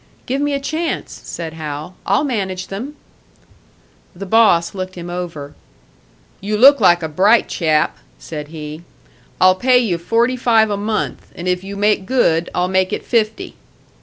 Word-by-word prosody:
"Give 270 +3 -2
me 290 0 0
a - - -1
chance," 315 +4 -4
said 165 -2 -6
Hal. 155 +2 -6
"I'll 200 +8 +2
manage 190 -9 -3
them." 245 +10 -6 1.2
The 195 +3 -7
boss 190 -5 +3
looked 185 -1 -6
him 175 0 -7
over. 165 -5 -6 0.9
"You 210 +2 -2
look 275 +5 +7
like 175 -3 +4
a - - -1
bright 195 +9 +3
chap," 155 -3 0 0.2
said 150 -2 -7
he. 155 0 -8 0.6
"I'll 185 0 +6
pay 250 +7 +3
you 210 -9 0
forty 230 +8 +1
five 225 -3 +3
a - - 0
month, 210 +2 -3
and 175 - -6
if 180 0 0
you 200 +1 -7
make 205 -1 +1
good 170 -10 +2
I'll 180 0 +1
make 185 0 +1
it - - -4
fifty." 220 -2 -1
190 Hz, 165 wpm, -18 LUFS, 170-230 Hz, 1.2 s, look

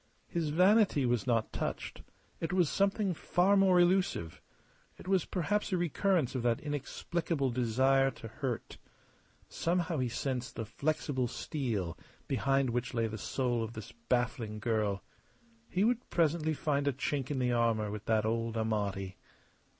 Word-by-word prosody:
His 165 -3 -1
vanity 185 - +4
was 120 0 0
not 115 -3 +1
touched; - - -4 0.4
it 165 - -2
was 180 -4 +2
something 200 -1 +1
far 180 +4 +2
more 190 -2 +5
elusive. 175 - +1 0.6
It - - -12
was 190 -2 +2
perhaps 205 +4 -1
a 185 - +2
recurrence 175 -3 +1
of 130 - -1
that 120 -1 +1
inexplicable 150 0 -2
desire 130 +3 +3
to 115 - -9
hurt. 120 +1 -4 0.7
Somehow 170 -2 -1
he 125 -1 0
sensed 125 +1 -3
the 115 - -3
flexible 140 +1 -1
steel 115 - -3 0.3
behind 135 0 +1
which 125 +1 -2
lay 115 -1 +2
the 110 -1 -4
soul 120 +1 -1
of 115 +1 -5
this 110 -1 -8 0.2
baffling 120 -3 0
girl. 105 -3 0 0.7
He 185 - +1
would 240 +2 +1
presently 160 -1 +1
find 145 -1 0
a 140 - +2
chink 135 0 -2
in 145 - -1
the 125 -1 +1
armour 115 -3 +1
with 105 0 -6
that 110 -1 +2
old 115 0 -1
Amati. 100 -4 -2
130 Hz, 150 wpm, -32 LUFS, 115-170 Hz, 0.7 s, more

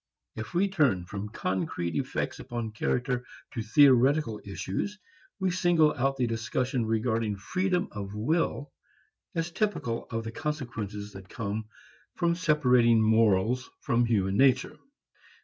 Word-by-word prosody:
If 110 +8 -7
we 190 +3 +3
turn 140 - +2
from 100 +2 -6
concrete 90 -4 -2
effects - - -2
upon 120 -3 -4
character 125 +3 -1 0.3
to 120 - -4
theoretical 130 0 +4
issues, 100 - -4 0.4
we 190 -1 +1
single 170 -4 +3
out 135 +1 0
the 125 - +1
discussion 115 +1 -1
regarding 110 -1 0
freedom 180 - -1
of 100 -1 -6
will 145 +4 0 0.6
as 165 +1 -1
typical 170 - -2
of 115 -1 -3
the 115 - -5
consequences 115 -9 -4
that 95 -1 -11
come 110 -2 -4 0.5
from 170 -1 +2
separating 125 -9 +4
morals 110 +2 +3
from 120 0 +2
human 100 -4 +1
nature. 130 0 +3
120 Hz, 130 wpm, -28 LUFS, 105-150 Hz, 0.6 s, theoretical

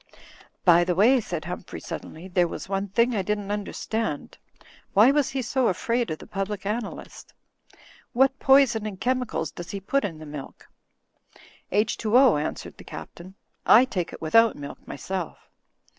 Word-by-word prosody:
"By 175 -1 +6
the 180 0 0
way," 240 +8 +5
said 170 -6 -5
Humphrey, 180 0 -6
suddenly, 165 +1 -8
"there 180 -1 +2
was - - -7
one 195 +1 -2
thing 235 +5 +2
I 200 - +1
didn't 205 +1 -2
imderstand. 210 -4 -3 0.6
Why 220 +7 +7
was 290 -1 +1
he 265 -2 -3
so 255 +1 +1
afraid 230 +4 0
of 155 - -3
the - - -12
Public 195 0 -4
Analyst? 215 +1 -5 0.8
What 265 +3 +2
poison 265 -6 +4
and 195 -3 -7
chemicals 250 -7 -1
does 175 0 -9
he 200 - -4
put 275 +9 0
in 165 -6 -4
the 155 - -10
milk?" 145 -2 -9 1.0
"H2O," 220 - +3
answered - - -6
the - - -12
Captain, 185 +3 -10 0.3
"I 245 +4 +7
take 185 -9 -3
it - - -10
without 225 +8 +4
milk 145 0 -9
myself." 185 -3 -5
205 Hz, 160 wpm, -25 LUFS, 175-235 Hz, 1.0 s, Why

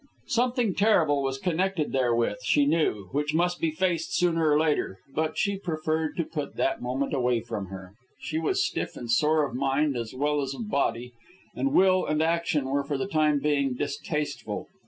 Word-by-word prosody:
Something 240 -3 +1
terrible 165 -9 +3
was 135 0 -1
connected 180 0 -1
therewith, 120 -5 +1
she 145 - +3
knew, 140 - 0
which 150 +2 -1
must 175 +1 +1
be 165 - +2
faced 170 0 -1
sooner 165 -3 +2
or 150 0 +4
later; 150 -11 0 0.2
but 155 +1 -1
she 200 -1 0
preferred 160 -3 -2
to 170 - +1
put 150 -2 -5
that 135 - 0
moment 130 +4 -2
away 125 -3 +1
from 105 -4 -5
her. 95 0 -9 0.3
She 155 - -3
was 160 - +1
stiff - - -3
and 120 -1 -4
sore 150 +4 +3
of 135 - -7
mind 135 +2 +1
as 115 0 -4
well 145 +2 +1
as 135 0 -3
of 215 -2 -6
body, 125 -3 -1 0.4
and 275 - 0
will 185 -6 +4
and 155 0 0
action 165 -3 +1
were 140 +1 0
for 140 0 -2
the 135 - -2
time 155 -5 +2
being 140 -3 +1
distasteful. 145 +1 -3
150 Hz, 185 wpm, -27 LUFS, 135-165 Hz, 0.4 s, or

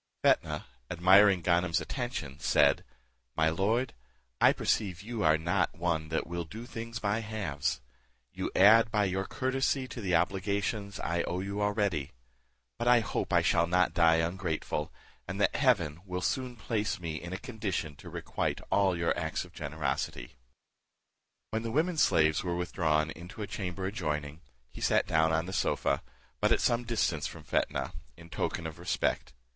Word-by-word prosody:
Fetnah, 75 0 +2 0.2
admiring 95 +2 +6
Ganem's 85 0 +2
attention, 120 - -4
said, 70 -1 +3 0.5
"My 80 0 +3
lord, 110 +9 0 0.5
I - - +7
perceive 95 -4 -1
you 115 0 -4
are 80 0 +5
not 85 +3 0
one 85 -3 -1
that 80 - -1
will 85 0 -4
do 110 +9 -9
things 115 -2 -6
by 105 0 0
halves: 110 -10 -2 0.5
you - - -3
add 110 +4 +7
by 105 -2 +2
your 95 +1 -1
courtesy 130 +2 0
to 120 - -6
the 90 -4 +1
obligations 100 +1 -1
I 85 0 0
owe 90 - -2
you 100 +2 -3
already; 100 - 0 0.7
but 120 - -1
I 120 -1 +6
hope 110 - -3
I - - +4
shall 85 0 +3
not 90 +1 +2
die 85 -1 +5
ungrateful, 80 -3 -2 0.4
and 95 +2 -4
that - - +2
heaven 85 - +2
will 90 -1 -4
soon 130 -2 -1
place 110 -3 -2
me 80 -3 -4
in 85 +1 -7
a 95 - -3
condition 105 - -4
to - - -11
requite - - -2
all 95 -3 +3
your 85 0 +1
acts 80 -2 -2
of - - -17
generosity." 70 -5 -3 1.2
When 110 +1 -1
the 115 - -4
women 160 +8 +1
slaves 80 - +3
were 90 -2 -1
withdrawn 80 -3 0
into 90 +7 -8
a - - -2
chamber 95 -1 -4
adjoining, 75 -6 -3 0.3
he - - -11
sat - - +3
down 80 0 +2
on 80 +1 +1
the 95 - -6
sofa, 70 -6 +1 0.4
but - - +2
at - - +4
some 120 0 +1
distance 105 -9 0
from - - -10
Fetnah, - - -1 0.2
in 85 0 -14
token 80 - -2
of 80 0 -6
respect. 65 -7 -1
90 Hz, 165 wpm, -30 LUFS, 80-110 Hz, 1.2 s, I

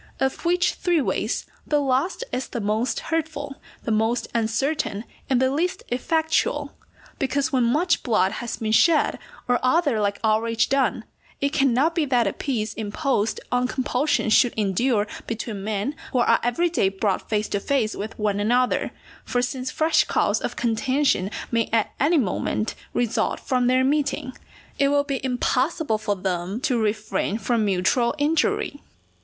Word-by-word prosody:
Of 265 +5 -1
which 355 +1 +2
three 350 -2 +1
ways 280 - -1 0.2
the 295 - +2
last 275 - 0
is 255 - -2
the 240 - -4
most 220 +3 -1
hurtful, 290 -3 -2 0.3
the 230 - -2
most 225 +3 +1
uncertain, 230 0 -1 0.3
and 260 -2 +3
the 260 0 +2
least 335 +6 -1
effectual; 315 +5 0 0.5
because 280 +3 0
when 255 -2 +3
much 305 +10 +2
blood 205 -6 +2
has 235 +2 -4
been 220 -1 -2
shed, 320 +8 +4 0.3
or 245 0 +2
other 255 -2 +2
like 200 -1 0
outrage 225 +1 +2
done, 265 -4 +1 0.4
it 280 +1 0
cannot 275 +3 +3
be 330 -3 +1
that 250 -4 +2
a 195 - 0
peace 220 -6 -2
imposed 220 +1 -1
on 250 0 +2
compulsion 260 -2 0
should 245 +2 +5
endure 210 +2 +1 0.2
between 220 -3 -4
men 215 +5 -2 0.2
who - - +1
are 235 -1 +4
every 245 +9 +1
day 195 - +2
brought 195 0 -2
face 210 -1 0
to 200 - 0
face 230 -1 0
with 215 +2 -6
one 210 -2 0
another; 245 +4 +2 0.3
for 245 - -1
since 255 +2 -3
fresh 310 0 +2
cause - - +1
of - - -3
contention 240 -3 +1 0.2
may 230 -1 +1
at 225 -2 +1
any 320 +5 +3
moment 215 -2 -1 0.2
result 240 -2 0
from 250 -2 0
their 255 +1 +3
meeting, 280 -2 0 0.4
it 280 - +4
will 285 0 +3
be 275 -3 -3
impossible 255 0 0
for 210 -1 -1
them 185 +2 -3
to 255 -4 0
refrain 215 -1 -1
from 235 -1 0
mutual 205 +6 +1
injury. 295 -1 0
245 Hz, 160 wpm, -24 LUFS, 220-285 Hz, 0.5 s, should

